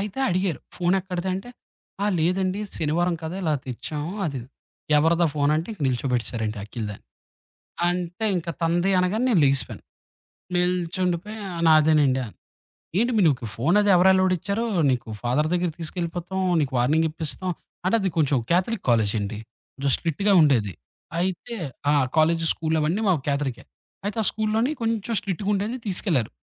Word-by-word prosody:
అయితే 205 Hz, +4 st, -5 dB
అడిగారు. 185 Hz, -2 st, 0 dB, 0.2 s
"ఫోనెక్కడిది" 180 Hz, 0 st, 0 dB
అంటే, 195 Hz, +6 st, -6 dB, 0.5 s
ఆ! 205 Hz, -, +2 dB
లేదండి. 185 Hz, +4 st, +1 dB, 0.2 s
శనివారం 170 Hz, +3 st, +1 dB
కదా! 160 Hz, +4 st, -4 dB
ఇలా 155 Hz, -3 st, +1 dB
తెచ్చాము. 145 Hz, +6 st, -5 dB
అది 140 Hz, -4 st, -3 dB
ఇది 120 Hz, -, -12 dB, 0.5 s
"ఎవరిదా 165 Hz, +2 st, +3 dB
ఫోను" 145 Hz, 0 st, +2 dB
అంటే 165 Hz, +6 st, -3 dB
ఇంక 200 Hz, -, -13 dB
నిల్చోబెట్టేసారండి 120 Hz, -4 st, -1 dB
అఖిల్ 110 Hz, +1 st, -5 dB
దాని. 100 Hz, -, -10 dB, 0.8 s
అంటే 180 Hz, +3 st, -2 dB
ఇంక 170 Hz, -1 st, -4 dB
తంది 175 Hz, +3 st, +2 dB
అనగానే 200 Hz, +7 st, +1 dB
నేను 185 Hz, -8 st, +4 dB
లేగిసిపోయాను. 135 Hz, -1 st, 0 dB, 0.7 s
నిల్చుండిపోయి 180 Hz, +3 st, -1 dB, 0.3 s
నాదేనండి 150 Hz, -4 st, +4 dB
అన్నా. 105 Hz, -, -14 dB, 0.6 s
ఏంటి 240 Hz, +2 st, +2 dB
మీ 205 Hz, -, +4 dB
నీకు 125 Hz, -6 st, +1 dB
ఫోనది 200 Hz, -, +3 dB
ఎవరు 180 Hz, +2 st, +5 dB
ఎలౌడ్ 185 Hz, 0 st, +3 dB
ఇచ్చారు 200 Hz, +6 st, -2 dB, 0.3 s
నీకు 120 Hz, -3 st, -2 dB
ఫాదర్ 140 Hz, +6 st, +1 dB
దెగ్గరకి 175 Hz, -2 st, 0 dB
తీసుకెళ్ళిపోతాం 175 Hz, +2 st, -4 dB, 0.2 s
నీకు 135 Hz, -3 st, -1 dB
వార్నింగ్ 155 Hz, +6 st, +3 dB
ఇప్పిస్తాం. 165 Hz, +3 st, -4 dB, 0.3 s
అంటే 185 Hz, -, +2 dB
అది 195 Hz, -, +1 dB
కొంచెం 145 Hz, -3 st, +3 dB
క్యాథలిక్ 190 Hz, +5 st, +1 dB
కాలేజండి. 105 Hz, -2 st, +1 dB, 0.6 s
స్ట్రిక్ట్‌గా 195 Hz, +5 st, 0 dB
ఉండేది. 115 Hz, -10 st, +3 dB, 0.5 s
అయితే 190 Hz, +6 st, -2 dB, 0.4 s
ఆ! -, -, +4 dB, 0.2 s
కాలేజి 165 Hz, +1 st, +3 dB
స్కూలు 160 Hz, 0 st, -1 dB
అవన్నీ 170 Hz, +8 st, 0 dB
మా -, -, +5 dB, 0.2 s
క్యాదలికే. 140 Hz, -3 st, -1 dB, 0.4 s
అయితే 205 Hz, +2 st, -3 dB
ఆ -, -, 0 dB
స్కూలులోని 220 Hz, +5 st, 0 dB
కొంచెం 230 Hz, 0 st, -1 dB
స్ట్రిక్ట్‌‌గుండేది 205 Hz, +4 st, -1 dB
తీసుకెళ్లారు. 175 Hz, -, 0 dB
170 Hz, 140 wpm, -24 LUFS, 145-190 Hz, 0.8 s, ఎవరు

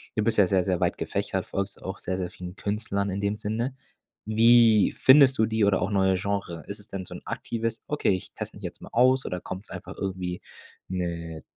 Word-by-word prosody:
du 110 Hz, -, +1 dB
bist 115 Hz, +1 st, +1 dB
ja 100 Hz, -, +7 dB
sehr, 95 Hz, -1 st, +2 dB
sehr 90 Hz, -1 st, 0 dB
weit -, -, +1 dB
gefächert, -, -, -2 dB
folgst 100 Hz, 0 st, -4 dB
auch 95 Hz, -, -5 dB
sehr, 95 Hz, 0 st, -3 dB
sehr 90 Hz, -1 st, -2 dB
vielen 90 Hz, 0 st, -9 dB
Künstlern 100 Hz, -1 st, -2 dB
in 95 Hz, +1 st, -3 dB
dem 100 Hz, +1 st, -1 dB
Sinne. 115 Hz, +5 st, -2 dB, 0.5 s
Wie 115 Hz, 0 st, +5 dB
findest 130 Hz, -2 st, +7 dB
du 110 Hz, -, +4 dB
die 110 Hz, -1 st, +2 dB
oder 100 Hz, -2 st, +2 dB
auch 90 Hz, -, 0 dB
neue 95 Hz, -2 st, +3 dB
Genre? 100 Hz, -3 st, -3 dB
Ist 100 Hz, -, -6 dB
es 105 Hz, -, -14 dB
denn 95 Hz, -1 st, -6 dB
so -, -, -8 dB
'n -, -, -9 dB
aktives: 115 Hz, -1 st, -3 dB
„Okay, 150 Hz, -, 0 dB
ich 95 Hz, -1 st, -3 dB
teste -, -, -7 dB
mich -, -, -14 dB
jetzt -, -, -6 dB
mal -, -, -10 dB
aus.“ 130 Hz, +2 st, +4 dB
oder 90 Hz, -1 st, -3 dB
kommt's 95 Hz, +3 st, -7 dB
einfach 90 Hz, +1 st, -8 dB
irgendwie, 95 Hz, -2 st, -3 dB, 0.5 s
ne 85 Hz, -3 st, -4 dB
100 Hz, 220 wpm, -26 LUFS, 95-110 Hz, 0.5 s, ja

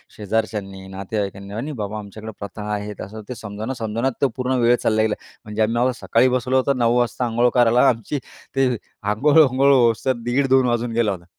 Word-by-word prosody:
शेजारच्यांनी, 105 Hz, -3 st, -3 dB
नातेवाईकांनी 100 Hz, +1 st, -4 dB
"नाही, 105 Hz, +3 st, -5 dB
नाही 150 Hz, +1 st, -5 dB
बाबा 105 Hz, 0 st, -4 dB
आमच्याकडे 110 Hz, +2 st, -8 dB
प्रथा 100 Hz, +1 st, -7 dB
आहेत." 105 Hz, 0 st, -5 dB
असं 110 Hz, +2 st, -9 dB
ते 125 Hz, -, -4 dB
समजावण्या-समजावण्यात 115 Hz, +3 st, -3 dB
तो 140 Hz, -, +3 dB
पूर्ण 130 Hz, +1 st, 0 dB
वेळ 120 Hz, +1 st, +5 dB
चालला 110 Hz, -1 st, +2 dB
गेला. 110 Hz, -1 st, +1 dB, 0.3 s
म्हणजे 105 Hz, +1 st, -3 dB
आम्ही 110 Hz, +2 st, +2 dB
आम्हाला 125 Hz, +2 st, +2 dB
सकाळी 120 Hz, +3 st, +3 dB
बसवलं 130 Hz, +1 st, +1 dB
होतं 130 Hz, +1 st, +1 dB
9:00 120 Hz, 0 st, +2 dB
वाजता 120 Hz, +1 st, 0 dB
अंघोळ 120 Hz, +1 st, +2 dB
करायला. 120 Hz, +2 st, +5 dB
आमची 120 Hz, +4 st, -2 dB, 0.4 s
ते 135 Hz, -1 st, +3 dB, 0.4 s
अंघोळ 135 Hz, +10 st, +3 dB
वांघोळ 140 Hz, -1 st, +5 dB
होस 120 Hz, -4 st, +3 dB
तर 130 Hz, -, +3 dB
दीड-दोन 130 Hz, +1 st, +3 dB
वाजून 120 Hz, 0 st, 0 dB
गेला 115 Hz, -2 st, +2 dB
होता. 90 Hz, -3 st, -7 dB
115 Hz, 190 wpm, -21 LUFS, 105-125 Hz, 0.4 s, वेळ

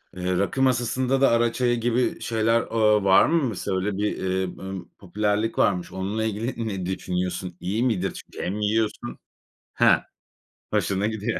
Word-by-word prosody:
eee, 90 Hz, 0 st, -1 dB
rakı 100 Hz, +8 st, 0 dB
masasında 130 Hz, +1 st, +1 dB
da 135 Hz, -, +6 dB
ara 115 Hz, 0 st, +2 dB
çayı 120 Hz, -2 st, +1 dB
gibi 120 Hz, +2 st, 0 dB
şeyler, 115 Hz, 0 st, +2 dB
ııı, 105 Hz, -3 st, +2 dB
var 95 Hz, -1 st, +6 dB
mı 165 Hz, -1 st, +2 dB
mesela? 95 Hz, -2 st, -2 dB
Öyle 95 Hz, +1 st, -2 dB
bir, 105 Hz, +1 st, -1 dB
eee, 95 Hz, 0 st, -1 dB
ımm, 95 Hz, -1 st, -7 dB
popülerlik 105 Hz, +3 st, -1 dB
varmış. 90 Hz, -3 st, +1 dB
Onunla 100 Hz, +4 st, -2 dB
ilgili 110 Hz, +2 st, -3 dB
ne 95 Hz, -4 st, -3 dB
düşünüyorsun? 90 Hz, -1 st, -3 dB
İyi 105 Hz, +6 st, -1 dB
midir? 100 Hz, -7 st, 0 dB
Çünkü -, -, -8 dB
hem 100 Hz, +4 st, -2 dB
yiyorsun. 105 Hz, -, -1 dB, 0.6 s
Heh. -, -, +5 dB, 0.7 s
Hoşuna 100 Hz, +1 st, +1 dB
gidiyor. 110 Hz, +1 st, -2 dB
105 Hz, 160 wpm, -24 LUFS, 95-115 Hz, 0.7 s, da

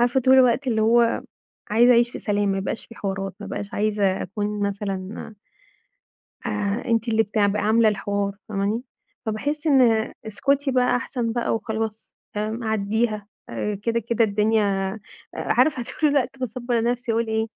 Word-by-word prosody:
عارفة 245 Hz, +2 st, +3 dB
طول 260 Hz, +1 st, +5 dB
الوقت 260 Hz, +1 st, +4 dB
اللي 220 Hz, -3 st, +1 dB
هو 235 Hz, +1 st, +3 dB, 0.5 s
عايزة 240 Hz, +3 st, +5 dB
أعيش 240 Hz, 0 st, +4 dB
في -, -, -7 dB
سلام، 205 Hz, -1 st, 0 dB
ما 195 Hz, 0 st, 0 dB
يبقاش 195 Hz, +3 st, -4 dB
في 230 Hz, -, -13 dB
حوارات، 195 Hz, -2 st, -4 dB
ما -, -, -6 dB
أبقاش 205 Hz, -1 st, -5 dB
عايزة 205 Hz, -2 st, +1 dB
أكون 205 Hz, +1 st, -2 dB
مثلًا 200 Hz, +1 st, -5 dB, 1.1 s
آآ، 210 Hz, 0 st, -1 dB
أنتِ 230 Hz, 0 st, +1 dB
اللي 225 Hz, 0 st, +3 dB
بتع 205 Hz, 0 st, +1 dB
ب 200 Hz, +1 st, 0 dB
عاملة 220 Hz, +2 st, +4 dB
الحوار، 200 Hz, -1 st, -1 dB
فاهماني؟ 205 Hz, +3 st, -1 dB, 0.4 s
فباحس 290 Hz, +9 st, -2 dB
إن 240 Hz, -6 st, +4 dB
اسكتي 275 Hz, +6 st, 0 dB
بقى 250 Hz, -1 st, +3 dB
أحسن 245 Hz, -3 st, -2 dB
بقى 240 Hz, -1 st, 0 dB
وخلاص، 220 Hz, 0 st, -4 dB, 0.2 s
آمم، 220 Hz, +3 st, -2 dB
عديها، 215 Hz, 0 st, 0 dB, 0.2 s
آآ 205 Hz, -, -2 dB
كده 230 Hz, 0 st, 0 dB
كده 230 Hz, -1 st, +3 dB
الدنيا 205 Hz, -1 st, +1 dB, 0.4 s
عارفة 265 Hz, -6 st, +2 dB, 0.2 s
طول 305 Hz, -2 st, +4 dB
الوقت 270 Hz, -2 st, 0 dB
باصبّر 240 Hz, -1 st, -1 dB
نفسي 245 Hz, 0 st, 0 dB
وأقول 230 Hz, 0 st, +1 dB
إيه؟ 220 Hz, 0 st, 0 dB
220 Hz, 155 wpm, -23 LUFS, 205-240 Hz, 1.1 s, طول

